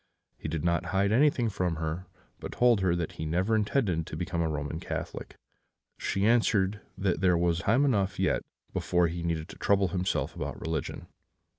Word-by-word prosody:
He - - -7
did 75 -1 -3
not 85 0 +1
hide 95 +3 +1
anything 125 0 +3
from 90 -4 -1
her, 80 +3 -4 0.3
but - - -6
told 120 -4 +4
her 90 -2 +2
that 85 -2 -2
he 80 - -6
never 95 +7 +1
intended 105 - +1
to 75 - -6
become 85 0 -2
a 80 - +1
Roman 75 +1 -3
Catholic. - - -5 0.6
She 100 +1 0
answered 105 -3 +3 0.2
that 95 -4 0
there 90 -2 +4
was 85 0 +1
time 120 +10 +3
enough 100 -7 +1
yet - - +2 0.3
before 90 -1 +2
he 85 +1 -4
need 85 -1 -2
trouble 100 -1 +1
himself 90 +1 -1
about - - -5
religion. 80 -3 -3
90 Hz, 175 wpm, -29 LUFS, 85-100 Hz, 0.6 s, told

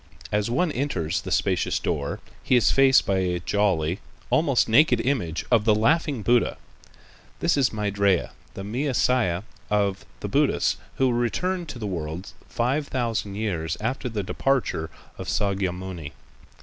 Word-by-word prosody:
As 105 +1 0
one 160 +8 +1
enters 85 - -1
the - - -7
spacious - - +1
door, 70 -1 -2 0.2
he 130 - +2
is 115 -6 +4
faced 135 0 +5
by 95 -1 +1
a 90 -1 0
jolly, 90 -2 0 0.3
almost 145 -6 +3
naked 125 +1 +5
image 115 - -1
of 115 -3 +5
the 110 -1 +4
"Laughing 140 +1 +1
Buddha." 120 +1 +2 0.8
This 170 - +2
is 135 -4 +3
Maitrêya, 100 -3 +1 0.2
the 95 - -6
Mea 130 +7 -2
siah 110 -9 +2 0.3
of 100 -2 +1 0.2
the - - -3
Buddhists, - - +2 0.2
who 135 - +2
will - - +1
return 175 +10 -1
to 145 - -7
the 110 - -5
world 85 -1 -4 0.2
five 135 +5 0
thousand 115 -5 -2
years 90 -7 -2
after 125 +3 -2
the 105 -3 -3
departure 115 -8 0 0.3
of - - -6
Sâkyamuni. 95 -5 -2
105 Hz, 150 wpm, -25 LUFS, 95-130 Hz, 0.8 s, faced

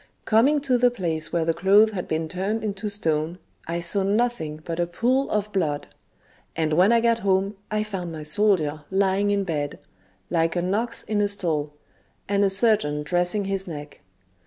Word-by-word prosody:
Coming 260 +7 +4
to 255 -3 +1
the 245 0 +5
place 170 -9 -3
where 170 -2 0
the 165 - +2
clothes 205 +5 +5
had 185 -4 -4
been 160 0 -1
turned 195 +6 -2
into 210 0 -3
stone, 165 -4 -1 0.3
I 170 +1 -2
saw 195 +3 0
nothing 200 -6 0
but 165 0 -4
a 175 - +1
pool 250 +10 +1
of 210 0 -1
blood; 150 -7 -1 0.7
and 160 -1 0
when 185 +7 +5
I 235 - +5
got 230 0 +2
home, 195 0 +1
I 215 0 0
found 190 -5 -5
my 155 -1 -6
soldier 155 -3 +1
lying 195 +1 +2
in 200 -1 +1
bed, 150 -5 -3 0.5
like 165 +1 +1
an 180 +2 0
ox 235 +3 -1
in 210 -1 0
a 205 - +3
stall, 160 -7 -1 0.5
and 200 0 +2
a 200 - +4
surgeon 195 -7 +1
dressing 180 +5 0
his 195 -1 -2
neck. 145 -3 -8
190 Hz, 185 wpm, -24 LUFS, 165-210 Hz, 0.7 s, the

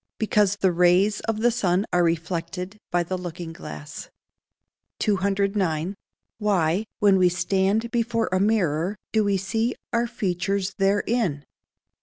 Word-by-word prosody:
_ - - -65
Because 210 -2 +2
the 190 -2 +2
rays 180 +4 +3
of 220 -1 -1
the 240 +1 +4
sun 195 -4 +1
are 175 0 +4
reflected 170 +4 -2
by 175 0 +1
the 185 +2 -4
looking 175 -2 -6
glass. 75 - -9 0.9
209. 195 -4 0 0.5
_Why, 195 -1 +1
when 200 -2 +4
we 180 -1 +5
stand 195 +5 0
before 230 -1 0
a 185 - +2
mirror, 190 -3 +1
do 220 -1 +2
we 200 -1 +1
see 225 +5 -1 0.2
our 235 0 +2
features 195 -3 -2
therein? 195 -5 +1
195 Hz, 135 wpm, -24 LUFS, 175-210 Hz, 0.9 s, we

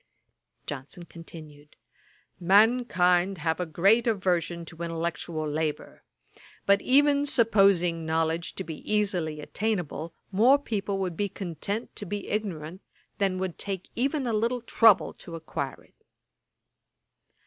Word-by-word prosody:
Johnson 145 +5 -7
continued. 155 -3 -13 0.6
'Mankind 195 -2 +3
have 160 +1 -1
a 180 - -2
great 195 +9 +3
aversion 175 -5 0
to 165 0 -11
intellectual 165 -1 -3
labour; 150 0 -3 0.6
but 200 0 +4
even 285 +2 +4
supposing 195 - +3
knowledge 160 +1 -1
to - - -4
be 160 -1 -7
easily 180 -8 0
attainable, 175 -4 -3 0.2
more 235 +8 +5
people 205 -7 -3
would 185 -3 -2
be 200 +3 -1
content 195 +5 -4
to 205 - -5
be 205 +2 -5
ignorant 185 -4 -4 0.4
than 195 -2 +1
would 185 -2 -4
take 195 -2 -5
even 270 +3 0
a 235 - -1
little 235 +3 0
trouble 225 -3 +4
to 170 - -10
acquire 155 -4 -5
it.' - - -30
185 Hz, 125 wpm, -27 LUFS, 165-210 Hz, 0.6 s, more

